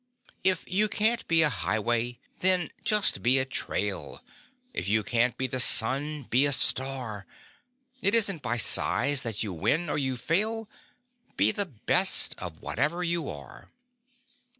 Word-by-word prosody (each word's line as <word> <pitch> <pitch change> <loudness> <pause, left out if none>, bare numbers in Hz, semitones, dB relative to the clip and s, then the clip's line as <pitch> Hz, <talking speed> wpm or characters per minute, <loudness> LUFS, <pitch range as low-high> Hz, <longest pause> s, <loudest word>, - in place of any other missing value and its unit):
If 185 -2 0
you 210 +3 0
can't 220 +2 -1
be 165 -1 +3
a 150 - +3
highway 120 +2 -3 0.2
then 185 -3 +2
just 210 -2 +2
be 125 +3 +3
a 130 - 0
trail, 105 -6 -4 0.5
If - - -5
you 110 +1 0
can't 120 +1 0
be 130 - -2
the 130 0 -4
sun 140 +6 +4
be 130 +3 +1
a - - +1
star; 130 -6 +1 0.7
It 200 +4 +1
isn't 200 -8 +2
by 120 -2 -2
size 140 +5 +2
that 115 -4 -2
you 100 -4 -6
win 155 - -2
or - - -2
you 130 -2 -3
fail 215 - -1 0.7
Be - - +4
the 205 -3 -1
best 120 -10 +2
of - - -10
whatever 170 +4 -3
you 170 -3 -2
are! 70 -3 -12
135 Hz, 150 wpm, -25 LUFS, 120-180 Hz, 0.7 s, sun